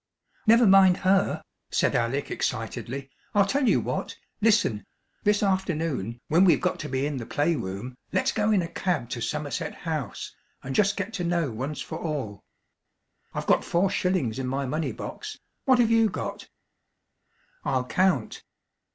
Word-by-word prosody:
"Never 230 +2 +7
mind 190 -2 +7
her," 190 +1 +3 0.3
said - - +2
Alec 125 +4 0
excitedly. 125 +3 -3 0.2
"I'll 200 -1 +5
tell 260 +4 +2
you - - +4
what. - - -3 0.3
Listen: 205 - +3 0.4
this 210 0 +3
afternoon, 165 - -1
when 170 +4 +4
we've 180 -4 +5
got 180 - -1
to 150 - -5
be 135 +1 0
in 145 -1 -2
the 120 - -5
play 160 +3 +1
room, 100 +3 -5 0.2
let's - - +2
go 210 0 +1
in 195 -4 +3
a - - -3
cab 170 -9 -2
to - - -3
Somerset - - -3
House, - - -4 0.3
and 135 - -4
just 200 +5 +2
get 205 +2 -3
to 190 -4 -2
know 170 -5 0
once 135 +7 -4
for - - -6
all. 130 - -4 0.9
I've - - -3
got - - +3
four 185 +3 +1
shillings 180 - 0
in 130 - -2
my 135 +2 -1
money 155 +5 -1
box; 425 0 -7 0.3
what 260 -3 +5
have 235 -2 +3
you 225 -1 +5
got?" - - -5 1.1
"I'll 130 -1 0
count." 180 - +1
165 Hz, 165 wpm, -26 LUFS, 130-195 Hz, 1.1 s, Never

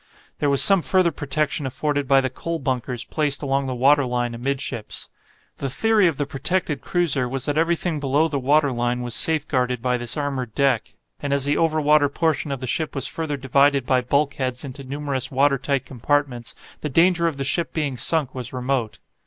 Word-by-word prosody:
There 145 - +1
was 140 -1 +3
some 195 -2 +6
further 185 0 +2
protection 145 -1 -2
afforded 145 +1 -2
by 135 0 +5
the 130 - -1
coal 165 +5 -4
bunkers 125 -3 -3
placed 150 -2 -1
along 135 0 0
the 130 - -3
water 140 +3 +4
line 120 -1 -2
amidships. 125 -2 -4 0.5
The 135 - -3
theory 210 - +3
of 160 -5 -1
the 145 - -1
protected 150 +3 -1
cruiser 145 -8 +1
was 135 0 -2
that 145 - -1
everything 165 0 0
below 145 +3 +2
the 145 -3 -2
water 140 +2 +3
line 120 0 -1
was 120 -1 -4
safeguarded 130 -6 +2
by 125 +1 0
this 120 +4 -3
armoured 135 -5 -3
deck, 135 -5 +2 0.3
and 145 - -4
as 140 -1 +2
the 145 +1 +1
over 160 -1 +2
water 150 -1 +4
portion 155 -1 -1
of 135 -2 -4
the - - -3
ship 150 +6 -2
was 135 -1 -2
further 155 -2 -3
divided 140 0 +2
by 130 0 +2
bulk 140 +3 +1
heads 130 -1 -3
into 140 0 -8
numerous 135 -1 -3
water 140 +1 +2
tight 140 -1 -1
compartments, 130 -1 -2 0.3
the 150 - -3
danger 170 +3 +3
of 155 -4 -3
the 135 - -2
ship 165 +5 -1
being 145 -5 -2
sunk 135 +2 0
was 125 -2 -6
remote. 125 -3 -2
140 Hz, 200 wpm, -22 LUFS, 130-150 Hz, 0.5 s, some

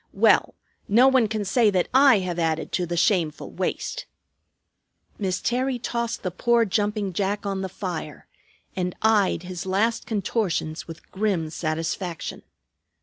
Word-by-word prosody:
Well, - - +3 0.3
no 235 +6 +6
one 260 -4 +4
can 215 -1 -3
say 220 +3 +3
that 185 -3 +1
I 265 -3 +7
have 175 -1 -3
added 160 -1 -1
to 180 -2 -1
the 175 +1 -3
shameful 170 -4 +1
waste." - - -3 1.1
Miss 185 -3 -1
Terry 255 +1 0
tossed 235 0 -3
the 185 - -2
poor 235 +5 +2
jumping 205 -1 -1
jack 200 +3 -1
on 195 -1 -2
the 190 - -3
fire, 175 -6 -6 0.5
and 180 -1 -2
eyed 210 -5 +3
his 180 0 -6
last 225 +5 0
contortions 190 -7 -2
with 165 -1 -11
grim 190 -6 -1
satisfaction. 165 +2 -3
195 Hz, 145 wpm, -24 LUFS, 175-225 Hz, 1.1 s, I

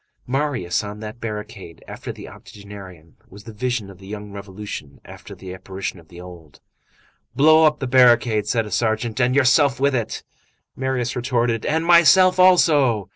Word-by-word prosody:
Marius 125 -10 -2
on 105 0 -8
that 110 +2 -8
barricade 105 -6 -8
after - - -8
the - - -11
octogenarian 95 -7 -13
was 100 +2 -14
the 110 - -11
vision 120 -1 -3
of 95 - -17
the 95 - -14
young 105 0 -8
revolution 100 -7 -9
after - - -12
the 95 -1 -10
apparition 95 0 -7
of 80 - -19
the 85 0 -14
old. 85 -4 -13 0.8
"Blow 155 +3 +5
up 150 -1 +2
the 135 - -5
barricade!" 120 -4 +3
said 115 -2 0
a 105 - -10
sergeant, 110 +1 -1
"and 125 +2 +1
yourself 140 -1 +3
with 140 +1 +1
it!" 120 -4 -3 0.5
Marius 130 -2 -3
retorted: 120 -2 -1
"And 160 +2 0
myself 180 +2 +5
also." 145 - +3
115 Hz, 165 wpm, -21 LUFS, 100-130 Hz, 0.8 s, Blow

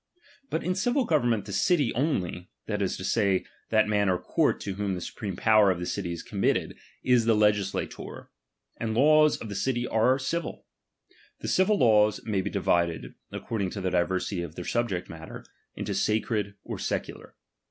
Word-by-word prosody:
But 160 - -2
in 180 +3 0
civil 245 +7 +1
government 120 - +1
the 100 - -6
city 140 - +2
only, 95 - -1 0.2
that 105 -2 -2
is 95 - -1
to 95 - -7
say, 100 -2 +1 0.2
that 110 -1 +3
mau 105 -1 +2
or 90 - +1
court - - +1
to 100 - -3
whom 100 -1 -2
the - - -4
supreme 100 +1 -5
power 110 -1 +5
of 90 -2 0
the 90 - -3
city 90 -1 -3
is 85 - -5
committed, - - 0 0.3
is 125 -3 +3
the 115 -1 +4
legislator; 105 -2 -1 0.5
and 110 -1 -2
the - - +1
laws 155 +1 +5
of - - -7
the 105 - -5
city 120 +4 -1
are 125 +4 +3
civil. 165 +6 -3 0.8
The - - -4
civil 200 +3 +3
laws 105 -4 +4
may 105 -4 0
be - - -3
divided, 85 -2 0 0.2
according 100 -5 -3
to 100 - -6
the 95 -1 -1
diversity 90 +1 0
of 85 -2 -7
their 90 - -6
subject 115 -7 -1
matter, 80 0 -9 0.3
mto - - -3
sacred 105 -1 0
or - - -6
secular. - - -4
105 Hz, 185 wpm, -27 LUFS, 95-120 Hz, 0.8 s, power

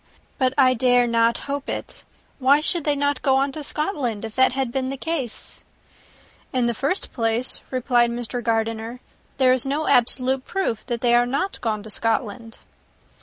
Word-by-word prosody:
But 260 0 +1
I 260 -2 +5
dare 245 0 +3
not 230 0 +2
hope 280 0 -4
it. - - -5 0.4
Why 275 +2 +5
should 330 +1 -1
they 295 -1 +2
not 285 -1 0
go 265 -1 +3
on 275 +1 +1
to 300 +2 -6
Scotland, 275 - -2
if 220 - -8
that 260 -1 +4
had 265 -2 -1
been 260 0 -2
the 275 - -4
case?" 275 -6 -4 0.9
"In 255 -2 +1
the 235 - +1
first 280 - -2
place," 230 +1 0
replied 245 -2 +2
Mr. 240 +1 -3
Gardiner, 225 +1 -2 0.4
"there 260 -2 +5
is 255 - +1
no 285 +3 -1
absolute 255 +2 +2
proof 360 - -2
that 240 -2 -2
they 240 -1 +3
are 240 0 +4
not 280 +10 -2
gone 215 -3 -2
to 220 - -8
Scotland." 225 +1 -2
255 Hz, 175 wpm, -23 LUFS, 235-275 Hz, 0.9 s, I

